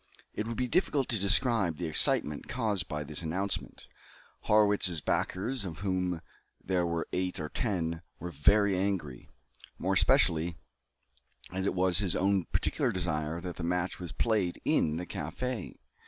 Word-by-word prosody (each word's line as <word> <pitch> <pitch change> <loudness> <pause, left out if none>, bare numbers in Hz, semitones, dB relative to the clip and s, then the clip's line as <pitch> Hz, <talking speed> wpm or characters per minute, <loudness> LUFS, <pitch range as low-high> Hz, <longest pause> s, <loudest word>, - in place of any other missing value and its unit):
It 110 - -3
would 115 - -4
be 125 - 0
difficult 145 -3 +1
to 115 - +1
describe 100 - +2
the 90 - -3
excitement 75 -1 +4
caused 105 -8 -1
by 75 0 -3
this 75 +2 -3
announcement. 95 +5 -3 0.6
Harrwitz's 105 -5 +3
backers, 100 - -1
of 85 -3 -7
whom 90 -3 -1 0.4
there 90 -2 0
were 85 -1 -2
eight 90 0 -1
or 75 -1 -4
ten, 85 -7 -2 0.2
were 90 - -5
very 100 +6 +3
angry; 90 -9 -2 0.5
more - - 0
especially 85 +1 +3 1.0
as 95 +1 -1
it - - -1
was 90 -1 +3
at - - +1
his 90 - 0
own 95 -1 +2
particular - - 0
desire 80 -2 -2
that 90 -1 -6
the 85 - -5
match 90 +2 -1
was 90 -3 -6
played 105 -6 0
in 75 0 +2
the 90 - -4
café. 125 +4 -4
90 Hz, 155 wpm, -30 LUFS, 85-100 Hz, 1.0 s, excitement